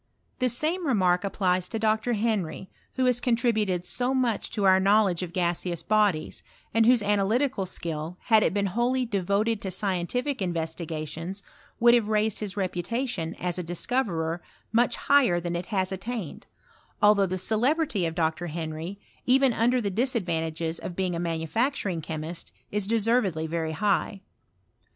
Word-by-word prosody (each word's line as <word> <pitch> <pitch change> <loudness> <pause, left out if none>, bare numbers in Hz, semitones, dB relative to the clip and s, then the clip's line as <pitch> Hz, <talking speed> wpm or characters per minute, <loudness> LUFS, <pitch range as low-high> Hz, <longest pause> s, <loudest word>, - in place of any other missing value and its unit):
The 255 -1 +2
same 315 +8 -1
remark 185 -7 +2
applies 185 -2 0
to - - -3
Dr. 220 +2 +1
Henry, 205 -5 -2 0.2
who 260 - +1
has 250 -1 +2
nontributed 220 -7 +1
so 245 +9 0
much 245 -5 0
to 210 - -2
our 190 -1 +6
knowledge 195 -2 +3
of 180 -2 -4
gaseous 175 -1 -1
bodies, 205 -7 +1 0.3
and 225 0 +4
whose 245 -3 +5
analytical 205 +2 +1
skill, 165 0 -5
had 220 -2 +4
it - - +2
been 200 +1 0
wholly 240 +6 0
devoted 205 +1 0
to 190 - -4
scientific 195 +9 -1
investigatioM, 165 +1 -4 0.4
would 235 0 +6
have 235 -3 +4
raiBed 215 0 +1
his 205 -1 -4
reputation, 185 0 -2
as 180 0 -3
a - - -2
discoverer, 175 -3 -1 0.3
much 235 +1 +2
higher 265 -12 +3
than 175 0 -3
it 175 +1 -4
has 190 -3 -1
attained; 200 -3 -5 0.6
althougt 205 -2 +5
the 185 - -1
celebrity 225 - +1
of 165 - -5
Dr. 165 0 0
Henry, 165 +3 -5 0.3
even 265 0 +4
under 240 +3 +2
the 205 -4 -2
disadvantages 170 - -1
of 175 - -6
being 185 -2 -1
a - - -3
manufacturing 175 - -1
chemist, 160 +2 -6 0.2
is 210 -1 -1
deservedly 215 -7 +1
very 160 0 -2
high. 200 +2 0
195 Hz, 150 wpm, -26 LUFS, 175-230 Hz, 0.6 s, our